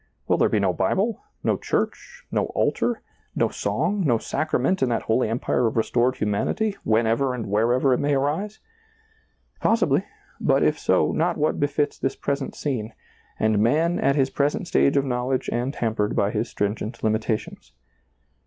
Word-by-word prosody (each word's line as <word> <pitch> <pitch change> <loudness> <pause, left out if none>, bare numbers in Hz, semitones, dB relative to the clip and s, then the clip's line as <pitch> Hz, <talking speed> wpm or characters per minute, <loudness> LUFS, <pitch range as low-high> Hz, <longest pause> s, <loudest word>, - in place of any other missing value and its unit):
Will - - +2
there - - +4
be 105 - +1
no 95 -3 +1
Bible, 195 - 0 0.2
no - - +1
church, - - -3
no - - 0
altar, 240 -2 0 0.3
no - - +2
song, 205 -1 -1
no 120 -7 +3
sacra 155 +6 -1
ment 185 +10 +1
in 130 - +2
that 115 -2 -1
holy 110 0 +1
empire 120 +1 0
of 115 - -3
restored 120 +3 +2
humanity, 125 - -1
whenever 115 +4 +1
and 115 -3 -4
wherever 120 +6 +2
it - - +1
may 145 0 +1
arise 155 +10 -1 0.5
?" 445 0 -39
Possibly; - - +2 0.4
but - - +2
if - - +2
so, - - +2
not 170 +2 0
what 155 +1 0
befits 145 +1 0
this 135 - -1
present 140 -1 -3
scene, 115 -6 -3 0.5
and 110 -1 +2
man 160 +10 +2
at 140 - +2
his 135 -2 +1
present 145 +6 0
stage 140 -3 +3
of 140 - +2
knowledge 125 0 -1
and 125 +4 -2
hampered 110 -3 -1
by 100 +1 +1
his 110 +1 -2
stringent 105 +3 -3
limitations. 110 0 -2
125 Hz, 170 wpm, -24 LUFS, 110-145 Hz, 0.5 s, there